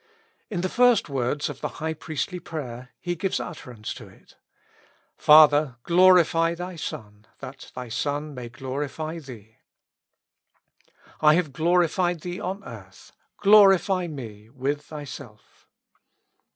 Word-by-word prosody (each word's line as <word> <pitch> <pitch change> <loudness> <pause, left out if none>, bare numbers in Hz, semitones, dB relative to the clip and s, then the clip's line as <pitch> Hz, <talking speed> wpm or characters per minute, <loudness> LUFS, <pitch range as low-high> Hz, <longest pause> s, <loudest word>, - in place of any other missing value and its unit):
In 190 -6 -3
the 185 - 0
first 245 -3 +3
words 135 +3 -1
of 145 -3 -8
the - - -1
high 160 +1 -2
priestly 160 +4 -4
prayer 125 -8 -7
He 175 - -3
gives 185 +2 -2
utterance 125 -10 -7
to - - -11
it: - - -21 0.4
" - - -31 0.3
Father, 150 -3 +6
glorify 170 -2 +4
Thy 180 +1 -6
Son, 105 -8 -8
that - - -10
Thy 125 -1 -6
Son 145 +5 -3
may 125 -3 -7
glorify 145 +6 -5
Thee.^' 115 -7 -13 1.3
"■ - - -33 0.3
I 155 0 +6
have 165 -6 -1
glorified 175 +2 +1
Thee 175 +1 -5
on 195 +3 -5
earth; - - -12 0.3
glorify 195 -3 +5
me 110 -8 -9
with 140 +3 -3
Thyself." 140 -7 -11
155 Hz, 130 wpm, -25 LUFS, 130-175 Hz, 1.3 s, Father